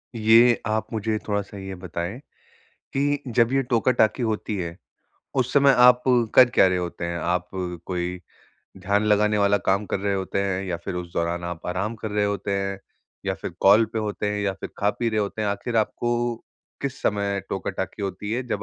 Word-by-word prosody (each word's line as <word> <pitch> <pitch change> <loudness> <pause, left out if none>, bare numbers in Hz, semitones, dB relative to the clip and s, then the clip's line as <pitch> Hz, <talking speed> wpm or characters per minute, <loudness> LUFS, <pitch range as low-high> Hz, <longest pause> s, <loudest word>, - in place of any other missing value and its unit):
ये 115 +2 +5
आप 110 0 -1
मुझे 110 0 -1
थोड़ा-सा 100 -1 -2
ये 95 0 -6
बताएँ 90 +5 -4 0.7
कि 145 +1 0
जब 115 +2 +3
ये 135 0 +3
टोका-टाकी 120 -1 +2
होती 110 -2 -2
है, 85 -2 -4 0.6
उस 130 -1 +1
समय 140 -1 +6
आप 125 0 +7 0.3
कर 125 -1 +8
क्या 95 - +5
रहे 90 -1 +1
होते 85 -1 -4
हैं? 85 0 -3
आप 90 +1 -1 0.4
कोई 90 0 -3 0.6
ध्यान 100 +3 +1
लगाने 105 0 +3
वाला 100 0 +3
काम 100 +2 +2
कर 100 - -2
रहे 100 0 0
होते 95 +1 -2
हैं, 95 -1 -1
या 85 -2 -2
फिर 90 +2 -6
उस 90 -1 -5
दौरान 85 +1 -1
आप 85 -1 -6
आराम 95 +6 -2
कर 110 -1 -6
रहे 105 0 +1
होते 100 -1 -2
हैं? 100 0 -3 0.5
या - - 0
फिर - - -6
कॉल 105 +4 +6
पे 110 - 0
होते 105 -1 -2
हैं, 105 - -2
या 100 -1 0
फिर - - -6
खा-पी 105 +3 0
रहे 110 - 0
होते 105 +1 -2
हैं? 105 - 0
आख़िर 100 +4 -3
आपको 120 +2 0 0.5
किस 140 -1 -4
समय 100 -1 0
टोका-टाकी - - -4
होती 100 +2 -4
है, 125 +2 -1
जब 105 - -2
105 Hz, 195 wpm, -24 LUFS, 95-115 Hz, 0.7 s, कर